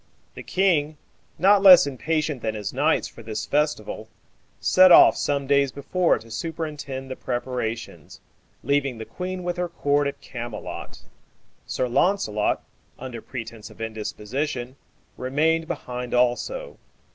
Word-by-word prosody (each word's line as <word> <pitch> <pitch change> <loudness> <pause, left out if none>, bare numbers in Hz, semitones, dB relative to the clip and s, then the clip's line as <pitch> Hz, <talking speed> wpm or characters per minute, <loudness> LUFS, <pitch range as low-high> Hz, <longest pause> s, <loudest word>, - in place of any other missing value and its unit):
The - - -9
king, 160 -6 +1 0.4
not 195 +4 +5
less 185 -5 +9
impatient 145 +1 -2
than 110 -1 -2
his 105 -2 -4
knights - - +1
for - - -13
this 110 -1 -5
festival, 145 -7 -1 0.5
set 185 0 +6
off - - +9
some 140 -1 -1
days 140 -1 +3
before 170 +6 +1
to 115 0 -14
superintend 145 -2 -5
the - - -3
preparations, 120 -3 -4 0.4
leaving 140 -3 0
the 110 - -7
queen 185 +4 -5
with 175 0 -3
her 180 0 -2
court 145 -3 +1
at 140 - -5
Camelot. 120 -1 -7 0.6
Sir 130 - -1
Launcelot, 120 - +1 0.3
under 125 -3 -7
pretence 115 -3 -8
of - - -17
indisposition, 120 +4 -4 0.4
remained 160 +5 +1
behind 125 -7 -4
also. 125 - 0
140 Hz, 130 wpm, -24 LUFS, 120-165 Hz, 0.6 s, less